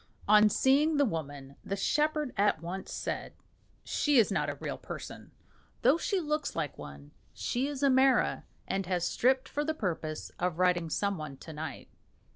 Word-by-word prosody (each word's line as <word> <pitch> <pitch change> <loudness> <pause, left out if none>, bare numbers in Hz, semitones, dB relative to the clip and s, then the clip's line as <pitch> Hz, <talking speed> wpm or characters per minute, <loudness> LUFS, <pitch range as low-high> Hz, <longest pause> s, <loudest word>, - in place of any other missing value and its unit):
On 210 +1 +7
seeing 285 +7 +3
the 285 - +4
woman 145 - -5
the 195 - -3
shepherd 300 +6 0
at 205 -4 +2
once 180 +4 -6
said, - - -4 0.5
"She 290 -2 +1
is 225 - +5
not - - 0
a - - -3
real - - -5
person, - - -8 0.5
though 330 - +5
she 395 +1 0
looks 305 -2 -2
like 155 -4 -2
one. 70 0 -10 0.2
She 255 +3 -1
is 285 -1 -4
a 280 - +5
mara, 260 0 +3 0.2
and 195 -1 -2
has 180 -2 0
stripped 260 +2 +2
for 295 - -2
the 315 +1 -1
purpose 160 - -3
of 180 -2 -1
riding 175 -2 +2
some 200 +2 -1
one 145 -3 -7
to 160 - -10
night." 150 -3 -6
200 Hz, 175 wpm, -30 LUFS, -, 0.5 s, On